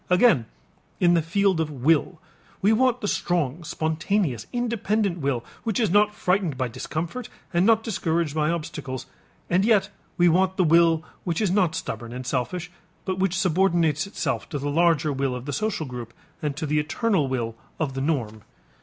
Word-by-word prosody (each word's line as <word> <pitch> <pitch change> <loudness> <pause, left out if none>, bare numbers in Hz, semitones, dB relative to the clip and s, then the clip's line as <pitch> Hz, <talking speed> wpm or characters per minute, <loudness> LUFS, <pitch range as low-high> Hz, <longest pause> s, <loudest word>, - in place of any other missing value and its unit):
Again 180 - +4 0.5
in 175 -1 +4
the 170 - +4
field 190 +2 +1
of 160 -1 0
will, 155 +4 +1 0.4
we 205 +3 +4
want 250 +1 +2
the 205 - -1
strong, 170 -5 -1
spontaneous, 160 - -1
independent 220 -6 0
will 135 -5 -1 0.2
which 225 0 -1
is 220 -7 +2
not 210 +1 +4
frightened 180 -8 0
by 130 -2 -1
discomfort 160 - -5 0.2
and 175 +4 +3
not 225 -1 +4
discouraged 170 -8 -1
by 155 0 +1
obstacles, 140 -6 -4 0.4
and 180 +2 +2
yet 205 -3 +3 0.3
we 175 - +5
want 185 +2 +3
the 185 - +4
will 165 -1 +4 0.2
which 170 -3 -1
is 205 -5 +1
not 180 -5 +2
stubborn 120 -6 -5
and 125 +1 -6
selfish 160 +9 -2 0.3
but 185 -1 -2
which 190 -1 +1
subordinates 175 -4 +2
itself 195 - -3
to 150 - -3
the 145 +1 -2
larger 160 -2 +3
will 135 -1 -1
of 125 0 -7
the 145 - -4
social 215 -2 -1
group 120 -3 -8 0.3
and 145 -2 -2
to 160 - -2
the 150 0 +1
eternal 160 - +1
will 120 -3 -2 0.2
of 150 -5 -1
the 135 - -3
norm. 120 -8 -1
165 Hz, 180 wpm, -25 LUFS, 145-195 Hz, 0.5 s, we